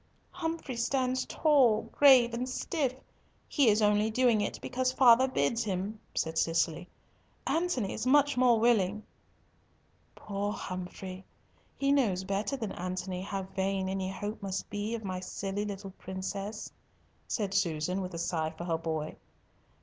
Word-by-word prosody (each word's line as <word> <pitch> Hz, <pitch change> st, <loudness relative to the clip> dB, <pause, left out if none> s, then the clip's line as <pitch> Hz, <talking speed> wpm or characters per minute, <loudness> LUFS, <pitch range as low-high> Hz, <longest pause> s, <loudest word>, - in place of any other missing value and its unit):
"Humfrey 325 Hz, -7 st, -4 dB
stands 255 Hz, +1 st, 0 dB
tall, 255 Hz, -8 st, +4 dB
grave, 255 Hz, -4 st, +6 dB
and 250 Hz, +2 st, -2 dB
stiff! 265 Hz, 0 st, -1 dB, 0.5 s
He 275 Hz, -6 st, +4 dB
is 210 Hz, +1 st, +3 dB
only 210 Hz, +1 st, +3 dB
doing 235 Hz, -1 st, +3 dB
it 205 Hz, -, -2 dB
because 255 Hz, 0 st, -1 dB
father 255 Hz, 0 st, +6 dB
bids 230 Hz, -, 0 dB
him," 200 Hz, +1 st, -3 dB, 0.2 s
said 160 Hz, 0 st, 0 dB
Cicely. 165 Hz, +1 st, 0 dB, 0.6 s
"Antony 320 Hz, -, 0 dB
is 220 Hz, -, -3 dB
much 290 Hz, +1 st, +4 dB
more 250 Hz, -2 st, +4 dB
willing." 215 Hz, -3 st, +2 dB, 1.1 s
"Poor 205 Hz, 0 st, -3 dB
Humfrey! 185 Hz, 0 st, -6 dB, 0.5 s
he 275 Hz, 0 st, +2 dB
knows 215 Hz, -10 st, +2 dB
better 200 Hz, +8 st, -2 dB
than 220 Hz, -6 st, -4 dB
Antony 185 Hz, +1 st, -4 dB
how 195 Hz, 0 st, -3 dB
vain 190 Hz, 0 st, -2 dB
any 190 Hz, 0 st, -2 dB
hope 205 Hz, +3 st, -5 dB
must 195 Hz, -1 st, -3 dB
be 205 Hz, +3 st, -2 dB
of 225 Hz, -, -6 dB
my 185 Hz, -2 st, -3 dB
silly 195 Hz, +2 st, -3 dB
little 195 Hz, -1 st, -6 dB
princess," 195 Hz, +3 st, -5 dB, 0.6 s
said 205 Hz, -4 st, -2 dB
Susan, 180 Hz, -1 st, 0 dB
with 185 Hz, -2 st, -5 dB
a -, -, -3 dB
sigh 160 Hz, -2 st, -1 dB
for 160 Hz, +2 st, -8 dB
her 165 Hz, -2 st, -1 dB
boy. 160 Hz, -2 st, -3 dB
205 Hz, 145 wpm, -30 LUFS, 185-245 Hz, 1.1 s, grave